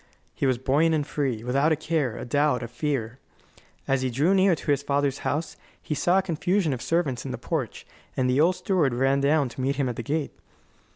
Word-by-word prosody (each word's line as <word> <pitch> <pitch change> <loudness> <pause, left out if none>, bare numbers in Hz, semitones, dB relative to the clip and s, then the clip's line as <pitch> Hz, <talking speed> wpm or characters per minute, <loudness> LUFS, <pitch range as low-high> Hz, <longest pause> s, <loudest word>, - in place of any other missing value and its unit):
He 140 - -1
was 130 -2 +2
buoyant 145 +6 +2
and 150 -2 -1
free, 130 -8 -2
without 140 +6 +2
a - - +4
care, 155 -6 -1
a - - -6
doubt, 145 -1 +1
a - - -4
fear. 125 -1 -3 0.7
As 135 -1 +1
he 130 - 0
drew 145 +10 +2
near 190 -2 +4
to 150 - -3
his 140 -1 +2
father's 140 -1 0
house 155 +3 -3 0.2
he - - -4
saw 175 +5 +2
a 195 - +2
confusion 175 -1 0
of 125 - -5
servants 160 -7 -1
in - - -6
the - - -4
porch, - - -4 0.3
and 130 - +2
the 130 +3 +3
old 175 +3 +4
steward 180 -8 +1
ran 135 +2 +2
down 145 0 +3
to 125 - -7
meet 135 +2 0
him 135 -1 0
at 120 - -4
the - - -2
gate. 145 +5 -2
140 Hz, 225 wpm, -25 LUFS, 130-160 Hz, 0.7 s, a